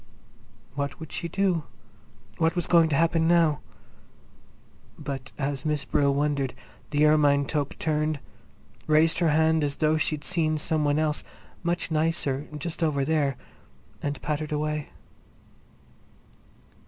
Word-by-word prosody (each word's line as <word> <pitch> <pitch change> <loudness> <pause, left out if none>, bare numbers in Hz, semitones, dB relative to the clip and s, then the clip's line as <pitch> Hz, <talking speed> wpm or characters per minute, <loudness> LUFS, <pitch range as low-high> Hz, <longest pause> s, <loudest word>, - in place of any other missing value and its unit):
What 140 0 -3
would 160 -2 -9
she 170 - -3
do? 180 -3 0 0.7
What 165 +1 +2
was 175 - 0
going 165 -2 +5
to 145 - +1
happen 165 +1 +2
now? 165 -4 +4 1.4
But 135 -2 -6
as 140 -2 -2
Miss 150 -2 -1
Brill 140 -1 +2
wondered, 140 -2 0 0.3
the 150 0 +3
ermine 145 -2 +4
toque 145 -1 -2
turned, 155 -1 0 0.7
raised 155 +1 +4
her 170 -2 +3
hand 160 +1 +3
as 140 -1 -1
though 155 0 +2
she'd 155 -1 -1
seen 160 -3 0
some 155 0 0
one 145 0 +2
else, 155 -1 0 0.4
much 175 -1 -1
nicer, 155 -3 0
just 165 +3 -5
over 145 -4 +1
there, 145 -4 +1 0.6
and 145 0 -3
pattered 150 0 -2
away. 150 0 -2
155 Hz, 130 wpm, -26 LUFS, 145-160 Hz, 1.4 s, going